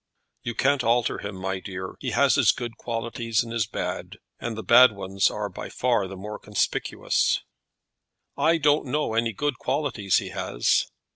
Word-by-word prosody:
"You 120 - -4
can't 140 -1 +2
alter 120 +1 +2
him, 100 -1 -6
my 95 0 -3
dear. 95 -1 -6
He - - -3
has - - +3
his - - +5
good 120 -2 -6
qualities 115 -1 -2
and 115 -1 -7
his 115 -3 0
bad, - - -4 0.2
and 115 -2 -4
the 110 - -5
bad 125 0 +7
ones 95 -1 0
are 105 -1 -3
by 95 - -8
far 120 -6 +1
the 95 - -8
more 105 +3 -7
conspicuous." 105 -2 0 0.9
"I 160 +4 +3
don't 145 -2 +2
know 145 -2 -1
any 115 0 +1
good 140 +5 -2
qualities 110 -10 0
he - - -2
has." - - +1
115 Hz, 170 wpm, -25 LUFS, 100-125 Hz, 0.9 s, bad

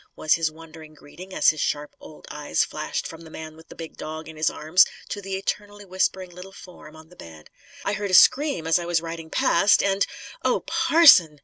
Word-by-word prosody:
was 155 - +1
his 165 -1 0
wondering 160 -1 -14
greeting 180 +6 -14
as - - +3
his 155 - -7
sharp 150 0 -3
old 75 -1 -14
eyes - - -1
flashed - - -5
from 165 0 -9
the 165 - -13
man 160 0 -10
with 160 +1 -17
the - - -13
big 165 -1 -10
dog 155 +1 -8
in 160 - -11
his 155 +1 0
arms 160 +5 +3 0.2
to 205 - -6
the 195 0 -5
eternally 205 +1 -5
whispering 185 0 -2
little 180 +2 -12
form 180 -5 -14
on 160 0 -16
the 180 - -18
bed. 80 - -14 0.3
"I - - -1
heard 205 -1 -4
a 185 - +3
scream, 275 - +4
as 165 +2 +2
I 170 - -6
was 175 -1 +1
riding 165 -1 -8
past, 200 +5 +3
and 200 0 0 0.2
" - - -16
"Oh, - - +1
parson!" 200 - +5
165 Hz, 220 wpm, -23 LUFS, 155-195 Hz, 0.3 s, parson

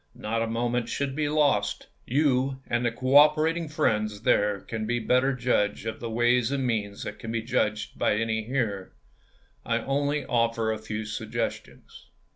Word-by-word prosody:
Not 115 +2 -2
a 115 - 0
moment 120 +1 -1
should 140 +1 -2
be 150 -1 0
lost. 140 -10 +1 0.2
You 135 -1 +1
and 120 +1 -1
the 120 - +1
cooperating 150 +6 +4
friends 105 -7 0
there 105 -3 +2
can 110 -1 -5 0.2
better 125 +2 +3
judge 110 -4 0
of 110 -1 -4
the 115 - -5
ways 120 +2 +2
and 135 -2 -1
means 105 -4 -2
than - - -6
can 110 - -6
be 115 -1 -2
judged 110 -2 -1
by - - +2
any 110 0 0
here. 110 -7 -2 0.7
I 115 0 0
only 145 +4 -1
offer 115 -2 +1
a 110 - -3
few 110 0 -5
suggestions. 110 - -5
115 Hz, 160 wpm, -26 LUFS, 110-135 Hz, 0.7 s, cooperating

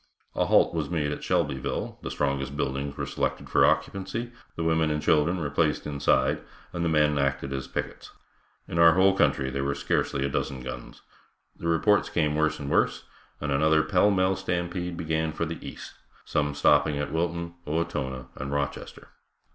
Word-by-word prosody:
A - - 0
halt - - +4
was - - -2
made 75 -4 -1
at 75 - -5
Shelbyville, 65 -1 -1
the - - -5
strongest 70 +1 -2
buildings 70 0 -2
were - - -2
selected - - -3
for - - +4
occupancy, 100 +5 -1 0.2
the 85 - -3
women 80 -1 +2
and 75 0 0
children 75 +4 +2
were 75 -5 -3
placed 75 +1 +1
inside, 70 -2 +1 0.3
and 85 - -2
the 85 - +1
men 75 -2 +3
acted 70 0 -1
as 65 -1 -4
pickets. - - -5 0.6
In 85 - -2
our 85 -1 +8
whole 95 +1 +5
country 65 -7 +2
there 70 +1 -2
were 70 0 -1
scarcely 70 0 0
a - - +1
dozen 65 -1 -3
guns. 65 -2 -8 0.5
The 85 - -5
reports 90 +5 +3
came 75 -1 +1
worse 75 0 +1
and 70 - -5
worse, - - +1 0.4
and 75 -1 -3
another 80 +2 +3
pell 90 +6 +3
mell 95 -1 +2
stampede 90 -1 -3
began 80 -2 -1
for 85 - -2
the 80 +1 -6
east, - - -8 0.3
some 75 -1 0
stopping 75 0 +3
at 75 - -3
Wilton, 85 +1 -2
Owatonna 65 -5 -2
and 65 +1 -5
Rochester. 70 -1 -4
75 Hz, 180 wpm, -27 LUFS, 70-85 Hz, 0.6 s, our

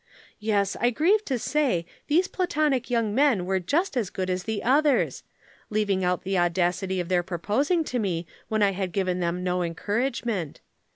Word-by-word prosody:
Yes, 205 -2 +1
I 240 - +3
grieve 360 - +2
to 260 - -1
say 245 - 0 0.2
these 345 +5 +3
Platonic 300 -10 0
young 230 -4 +1
men 255 -8 +3
were 190 +1 +1
just 305 - 0
as 225 -7 0
good 185 -1 -3
as 180 0 -2
the 220 -2 -3
others; 285 +2 +2 0.5
leaving 205 -3 0
out 180 0 0
the 190 -1 0
audacity 180 +2 0
of 175 - -2
their 180 -1 +2
proposing 210 - 0
to 250 -5 -2
me 175 -5 -1 0.2
when 215 -1 +1
I 200 - +4
had 185 -2 -3
given 185 -2 0
them 175 +1 -1
no 180 0 0
encouragement. 205 - -2
205 Hz, 175 wpm, -26 LUFS, 180-260 Hz, 0.5 s, I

